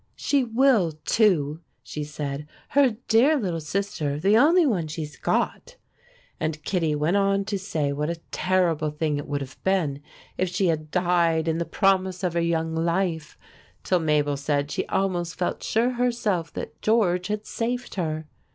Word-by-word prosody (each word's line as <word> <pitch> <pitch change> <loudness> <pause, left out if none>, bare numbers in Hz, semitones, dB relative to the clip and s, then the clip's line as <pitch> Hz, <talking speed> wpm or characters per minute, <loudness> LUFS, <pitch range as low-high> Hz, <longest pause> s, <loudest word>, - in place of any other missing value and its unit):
"She 280 -2 +1
will, 230 - +3
too," 160 -6 +2 0.2
she 150 - -5
said. 150 -1 -5 0.2
"Her 265 -6 +3
dear 260 +8 +5
little 180 -9 -2
sister 155 -4 -2
the 195 +6 +3
only 320 +8 +5
one 185 - 0
she's 150 -1 -6
got." - - -1 0.6
And 155 -1 -3
Kittie 165 -5 0
went 155 +6 +1
on 195 0 +2
to 200 -1 -2
say 155 -7 -1
what 150 +2 -2
a 170 -1 -3
terrible 175 -5 +1
thing 150 0 -1
it 145 - -7
would 145 -1 -2
have 135 -1 -9
been 165 -8 0 0.4
if 185 - +1
she 185 0 +1
had 155 -1 -2
died 170 -2 +2
in 160 0 0
the 170 - -1
promise 190 -1 +1
of 180 -2 0
her 170 - +1
young 165 -1 0
life, 165 -1 -1 0.5
till 180 - +2
Mabel 150 -3 +1
said 145 0 -1
she - - -2
almost 180 -3 -1
felt 180 - -2
sure 235 +3 +1
herself 235 -9 0
that 150 - -7
George 185 -5 +2
had 210 0 -3
saved 245 +2 -3
her. 155 -4 -2
175 Hz, 170 wpm, -25 LUFS, 155-200 Hz, 0.6 s, dear